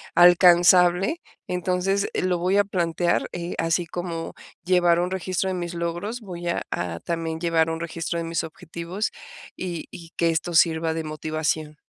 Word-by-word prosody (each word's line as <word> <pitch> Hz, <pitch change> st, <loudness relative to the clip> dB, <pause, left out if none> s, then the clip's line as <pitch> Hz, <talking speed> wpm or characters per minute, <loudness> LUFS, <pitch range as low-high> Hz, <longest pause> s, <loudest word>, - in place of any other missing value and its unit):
alcanzable, 175 Hz, -, +6 dB, 0.3 s
entonces, 180 Hz, +2 st, 0 dB
eh, -, -, 0 dB
lo 180 Hz, -1 st, +1 dB
voy 180 Hz, +3 st, +1 dB
a 205 Hz, -, +5 dB
plantear, 175 Hz, -3 st, 0 dB
eh, 175 Hz, 0 st, -4 dB
así 165 Hz, +1 st, +1 dB
como 170 Hz, -1 st, -5 dB, 0.3 s
llevar 175 Hz, -1 st, +3 dB
un 180 Hz, +1 st, -2 dB
registro 190 Hz, 0 st, -1 dB
de -, -, -1 dB
mis 175 Hz, -1 st, -4 dB
logros, 175 Hz, +8 st, -3 dB
voy 175 Hz, -4 st, -7 dB
a 170 Hz, -, 0 dB
a 85 Hz, -1 st, -3 dB
también, 165 Hz, -1 st, -3 dB
llevar 165 Hz, -2 st, +2 dB
un 165 Hz, 0 st, -3 dB
registro 170 Hz, 0 st, -3 dB
de -, -, -3 dB
mis 165 Hz, 0 st, -1 dB
objetivos, 170 Hz, +5 st, -5 dB, 0.5 s
y 175 Hz, -3 st, -4 dB
y 165 Hz, -1 st, -11 dB
que 170 Hz, -, +2 dB
esto 165 Hz, +1 st, -1 dB
sirva 160 Hz, -1 st, +3 dB
de 160 Hz, 0 st, -3 dB
motivación. 155 Hz, 0 st, -3 dB
170 Hz, 165 wpm, -24 LUFS, 165-180 Hz, 0.5 s, alcanzable